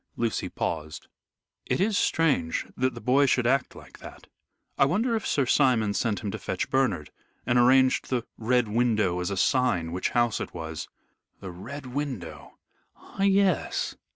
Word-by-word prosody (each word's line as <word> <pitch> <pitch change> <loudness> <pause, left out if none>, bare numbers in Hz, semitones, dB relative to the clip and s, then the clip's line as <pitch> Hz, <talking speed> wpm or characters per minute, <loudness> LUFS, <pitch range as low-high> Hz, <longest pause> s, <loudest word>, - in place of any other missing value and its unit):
Lucy 115 -1 -2
paused. 80 -2 -4 0.6
"It - - 0
is 205 +3 +1
strange 145 - +1
that 130 +1 0
the - - -7
boy 135 +3 +3
should 125 -1 +2
act 130 +2 +1
like - - -14
that. - - -12 0.5
I - - +4
wonder 220 - +1
if 220 - -2
Sir 140 - +1
Simon 120 -6 +2
sent 110 0 -1
him 105 - -2
to - - -5
fetch - - -3
Bernard, 110 - 0 0.3
and 120 +1 +3
arranged 130 +1 +4
the 125 -3 -1
Red 120 +1 +1
Window 105 -5 +1
as 90 - -2
a 100 - -3
sign 95 -9 +1
which 90 +2 -1
house 120 -1 +2
it - - -6
was?" 80 -2 -6 0.5
"The 95 - -7
Red 130 +11 -8
Window. 120 - -6 0.4
Ah - - -10
yes! 195 -2 +2
125 Hz, 165 wpm, -26 LUFS, 95-135 Hz, 0.6 s, I